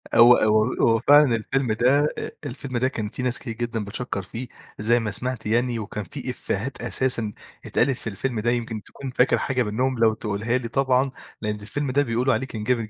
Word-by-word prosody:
هو 120 +1 +9
هو 110 +2 +3
هو 115 -1 +3
فعلًا 145 0 +6
الفيلم 125 +2 -1
ده 130 +6 +3
أ - - -4
الفيلم 130 -1 -4
ده 130 +2 +2
كان 110 -6 -3
فيه 125 - -6
ناس 125 -1 +1
كتير 115 -4 -5
جدًا 115 -2 -3
بتشكّر 100 0 -4
فيه 115 +7 -7 0.3
زي 115 +3 +3
ما 110 -2 -2
سمعت 125 +2 -4
يعني 120 +1 +1
وكان 105 0 -5
في 85 - -7
إفّيهات 120 +6 -3
أساسًا 120 -3 0 0.3
اتقالت 130 +1 +1
في - - -7
الفيلم 115 +3 -2
ده، 120 +2 +1
يمكن 115 -3 -3
تكون 135 -2 -8
فاكر 125 +1 +3
حاجة 130 -2 0
منّهم 125 +4 -1
لو 115 -1 +4
تقولها 110 +2 -1
لي 120 -2 -4
طبعًا، 135 +1 +2 0.3
لإن 105 -1 -1
الفيلم 130 +7 -3
ده 140 +2 +3
بيقولوا 125 +1 +1
عليه 135 - -1
كان 110 -4 -6
جامد 115 -1 0
120 Hz, 205 wpm, -24 LUFS, 110-130 Hz, 0.3 s, هو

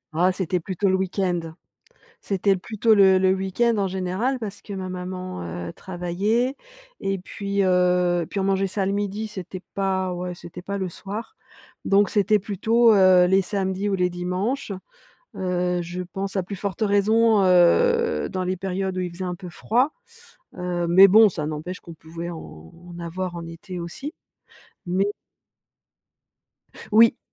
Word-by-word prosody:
Oh, 180 +3 +4
c'était 185 -1 -1
plutôt 190 +3 -1
le 190 - +3
week-end. 185 -1 0 0.8
C'était 195 0 +1
plutôt 220 +3 +2
le 190 -2 +6
le 190 0 +3
week-end, 195 +5 0
en 195 -2 0
général, 190 +8 -1
parce 205 -3 -7
que 205 - -9
ma 190 -1 -4
maman, 185 - -5 0.3
heu, - - -7
travaillait, 195 +9 -1 0.4
et 195 0 -1
puis, 200 +2 -3
heu, 180 -2 +2
puis 200 - -3
on - - 0
mangeait 195 0 +1
ça 195 0 -2
le 195 - 0
midi. 205 +2 -2
C'était 185 -2 -7
pas 190 -2 0
ouais, 180 0 -4
c'était 175 +1 -10
pas 200 +1 -4
le 190 -1 -2
soir, 210 - -7 0.5
donc 200 0 +4
c'était 210 0 +3
plutôt, 225 +4 +3
heu, 185 -2 +6
les 190 +1 +3
samedis 195 0 -2
ou - - +1
les 180 0 +2
dimanches. 185 +7 -2 0.6
Heu, 180 -1 -1
je 175 +2 -5
pense, 195 +2 -5
à 190 - 0
plus 200 +2 -6
forte 195 +1 -5
raison, 215 +1 +3
heu, 465 - +4
dans 185 -1 -3
les 185 0 -2
périodes 190 0 -3
où - - 0
il 180 -1 -3
faisait 180 +2 -7
un 180 -1 -3
peu 180 -1 -9
froid. 245 - +1 0.7
Heu, 175 -1 -2
mais 190 +3 +8
bon, 215 +3 +7
ça 155 -5 -4
n'empêche 155 +4 -5
qu'on 170 - -11
pouvait 165 +2 -7
en 80 - -10 0.3
avoir 175 +1 -4
en 170 -1 -6
été 165 +2 -8
aussi, 270 - -6 0.7
mais 185 +3 +1 1.9
Oui. 230 +2 +6
190 Hz, 165 wpm, -23 LUFS, 180-200 Hz, 1.9 s, mais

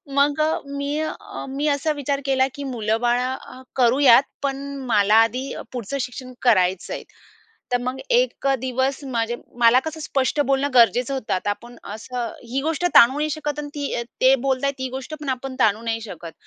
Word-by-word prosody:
मग 285 +1 +3
अ, 310 +1 +1
मी 280 +1 -3
अ, 315 - -6
मी 280 +3 -2
असा 285 +2 +1
विचार 280 0 -2
केला 265 -1 +3
की 285 - -6
मुलंबाळ 240 0 0
अ, 255 0 -5
करूयात 255 0 +6 0.2
पण 275 -1 0 0.3
मला 210 -1 +4
आधी 245 +4 +2 0.2
पुढचं 245 +3 -4
शिक्षण 255 +1 -6
करायचं 185 -6 +2
आहे. - - -5 0.7
तर 245 - +3
मग 255 +2 -3
एक - - +2
दिवस 260 +1 -1
माझे 235 -2 -1 0.2
मला 235 +1 +6
कसं 315 0 -5
स्पष्ट 280 -1 0
बोलणं 275 0 +2
गरजेचं 245 +2 +4
होतं. 260 -5 -4
आता 185 +2 -1
आपण 235 +4 -7 0.2
असं, 235 +2 -4 0.2
ही 265 +2 0
गोष्ट 325 +2 -1
ताणू 250 +4 +7
नाही 305 +1 0
शकत 300 -1 -3
आणि 290 - -6
ती 285 -1 -3
अ, 235 - -1 0.2
ते 260 +1 +7
बोलताय 275 +1 +1
ती 260 0 -3
गोष्ट 265 +4 -6
पण 295 - -6
आपण 260 +1 -4
ताणू 220 0 +3
नाही 225 -1 -2
शकत. 175 -6 -8
260 Hz, 180 wpm, -22 LUFS, 235-280 Hz, 0.7 s, ताणू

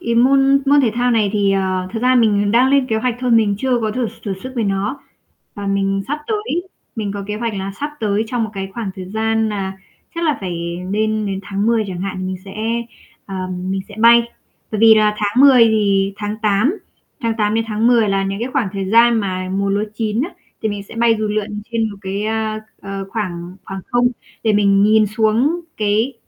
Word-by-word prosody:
Cái 235 0 -1
môn 270 +3 +4
môn 285 +1 +5
thể 240 -5 +2
thao 245 +1 +1
này 215 -4 +2
thì, 200 -2 +2
ờ, 185 -1 -1
thực 225 +1 -4
ra 255 0 +4
mình 205 -4 +3
đang 250 +4 +4
lên 275 -2 +3
kế 220 - 0
hoạch 240 +1 -1
thôi, 250 -1 0
mình 220 -3 +4
chưa 255 -1 +1
có 215 -1 -1
thử 240 0 -1
s - - -16
thử 195 -2 -2
sức 260 0 -7
với 230 -3 0
nó. 200 +7 -2 0.5
Và 205 -1 -6
mình 195 0 0
sắp 295 - -1
tới 420 -5 -2 0.3
mình 205 -2 -2
có 200 -1 -5
kế 210 0 -3
hoạch 230 -1 -3
là 195 0 -4
sắp 295 +1 -2
tới 215 0 0
trong 235 -1 -1
một 220 - -5
cái 195 -1 -5
khoảng 225 -5 -3
thời 185 - -6
gian 220 0 +1
nà 195 -2 -4 0.4
chắc 335 0 -2
là 305 -2 +2
phải 170 -2 -4
nên 215 0 0
đến 195 -1 -3
tháng 200 +2 -2
10 230 -2 +2
chẳng 180 -2 -5
hạn 185 -1 -4
mình 185 0 -3
sẽ, 195 - -10 0.7
à, 190 -2 -4 0.2
mình 195 0 -1
sẽ 205 - -11
bay. 235 +1 +7 0.5
Bởi 215 - -2
vì 225 -1 +8
là 215 -1 +3
tháng 210 +4 +1
10 260 -4 +8
thì 200 -3 +2
tháng 210 0 -4
8, 215 - +2 0.4
tháng 230 -2 0
8 210 0 +1
đến 225 - +1
tháng 220 +1 0
10 230 -4 +4
là 195 0 +1
những 195 +1 -3
cái 245 - -2
khoảng 255 -8 +1
thời 195 -1 -3
gian 235 +1 +6
mà 185 -2 -3
mùa 195 +1 -1
lúa 205 +2 +1
chín 220 +2 -1
á, 345 - -3 0.3
thì 220 - +1
mình 205 -1 -4
sẽ 200 - -13
bay 230 0 +4
dù 215 -1 -1
lượn 210 0 -3
trên 225 -1 0
một 200 - -9
cái, 195 +2 -3
a, 220 0 -2 0.2
ờ, 195 0 -5
khoảng 180 -4 -4
khoảng 195 0 -6
không 245 0 +3 0.3
để 220 - +2
mình 200 -1 +4
nhìn 215 +1 +5
xuống 225 - +1 0.2
cái 215 +5 +1
215 Hz, 230 wpm, -18 LUFS, 195-235 Hz, 0.7 s, vì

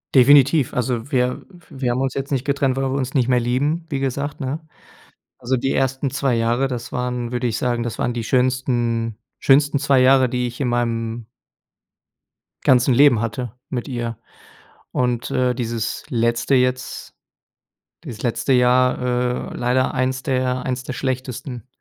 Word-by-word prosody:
Definitiv. 140 +1 +5
Also, 125 +2 -2
wir 125 -1 +1 0.3
wir 130 -3 -2
haben 125 +2 -1
uns 135 -1 -1
jetzt 135 +1 -4
nicht 135 -1 -1
getrennt, 140 -2 0
weil 135 - 0
wir 130 - -1
uns 130 -1 -3
nicht 125 -4 +2
mehr 125 -1 +3
lieben 145 +8 0
wie 140 -3 -2
gesagt, 140 +2 -3
ne? 135 +4 -3 0.8
Also 130 0 -1
die 135 +2 -1
ersten 130 +1 0
2 135 -2 0
Jahre. 120 +4 +1
Das 120 -2 -5
waren 125 -1 -3
würde 125 0 -1
ich 110 -2 -1
sagen, 120 -1 -1
das 120 -2 -4
waren 120 - -1
die 115 -2 -3
schönsten 120 -3 0 0.2
schönsten 145 +1 +4
zwei 140 -2 +3
Jahre, 130 0 +5
die 125 0 -1
ich 120 +3 -8
in 130 - 0
meinem 115 -1 -2 1.4
ganzen 130 0 +4
Leben 130 -4 +5
hatte 115 0 -4 0.2
mit 125 0 -4
ihr 120 -3 -4 0.8
und, 125 0 -1
äh, 125 -2 +1
dieses 115 -2 -3
letzte 115 +1 +1
jetzt 125 0 -1 0.9
dieses 115 -2 -8
letzte 120 +2 0
Jahr, 125 0 +4 0.5
äh - - -7
leider 125 +1 +1
1 130 0 -1
der 130 -2 -1
1 130 -1 -3
der - - -5
schlechtesten. 130 -2 -4
125 Hz, 160 wpm, -21 LUFS, 120-135 Hz, 1.4 s, Definitiv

